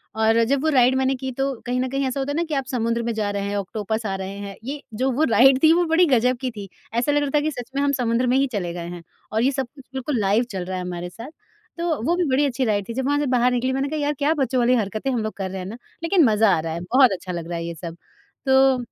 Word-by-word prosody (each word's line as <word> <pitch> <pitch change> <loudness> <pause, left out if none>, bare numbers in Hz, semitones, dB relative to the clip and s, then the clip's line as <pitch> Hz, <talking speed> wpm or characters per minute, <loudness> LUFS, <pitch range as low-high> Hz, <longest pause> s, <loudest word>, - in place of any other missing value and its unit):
और 220 +1 +3
जब 280 -1 +2
वो 315 - +2
राइड 255 -2 +4
मैंने 265 0 +1
की 265 0 -5
तो 275 0 0
कहीं 250 +1 -1
ना 255 - 0
कहीं 275 +1 -1
ऐसा 260 +2 -3
होता 275 +1 -2
है - - -3
ना 335 - +1
कि - - -2
आप 270 -1 -1
समुद्र 235 -1 0
में 235 0 -1
जा 215 -2 -1
रहे 200 0 -2
हैं, 205 - -2
ऑक्टोपस 215 +3 -3
आ 195 -2 -1
रहे 195 +1 -6
हैं। 200 -1 -7
ये 280 +4 -5 0.2
जो 260 +3 +1
वो 275 +5 +1
राइड 265 +3 +6
थी 315 - +7
वो 350 +1 +3
बड़ी 330 +2 +4
ग़ज़ब 250 -3 +2
की 255 -2 -2
थी, 205 -3 -9 0.2
ऐसा 240 +5 +1
लग 290 0 +2
रहा 290 - -1
था - - +5
कि 310 +1 -1
सच 250 -2 -8
में 280 - +1
हम 285 0 +2
समुद्र 245 -2 0
में 250 +2 +3
ही 275 - +2
चले 180 -5 -2
गए 170 -1 -6
हैं 175 -1 -8 0.3
और 220 +1 +1
ये 265 - +3
सब 265 -2 -2
कुछ 270 -2 -14
बिल्कुल 265 -1 -2
लाइव 205 +4 +2
चल 185 -3 -4
रहा 185 +1 -4
है 180 - -4
हमारे 175 0 -5
साथ। 230 +10 -10 0.5
तो 335 -6 -1
वो 335 +7 +2
भी 360 - +1
बड़ी 270 +3 +3
अच्छी 260 -1 -1
राइड 205 -3 0
थी। - - -3
जब 260 +2 -2
वहाँ 290 +1 +1
से 295 - 0
बाहर 250 -1 +3
निकली 250 +1 0
मैंने 270 +1 -1
कहा, 310 +1 -3
"यार 290 0 0
क्या 295 +2 +2
बच्चों 265 -4 0
वाली 245 +1 +3
हरकतें 215 +3 -2
हम 235 -4 -1
लोग 215 - -3
कर 190 -1 -3
रहे 190 - -5
हैं 180 - -6
ना 220 +4 -7 0.3
लेकिन 335 +1 +4
मज़ा 220 -1 +4
आ - - -1
रहा 160 0 -3
है 170 - -4
बहुत 250 +7 +4
अच्छा 185 -1 -5
लग 170 -2 -5
रहा 170 - -3
है 170 - -4
ये 170 - -4
सब।" 165 0 -7 0.5
तो 265 0 +5
250 Hz, 310 wpm, -23 LUFS, 205-275 Hz, 0.5 s, थी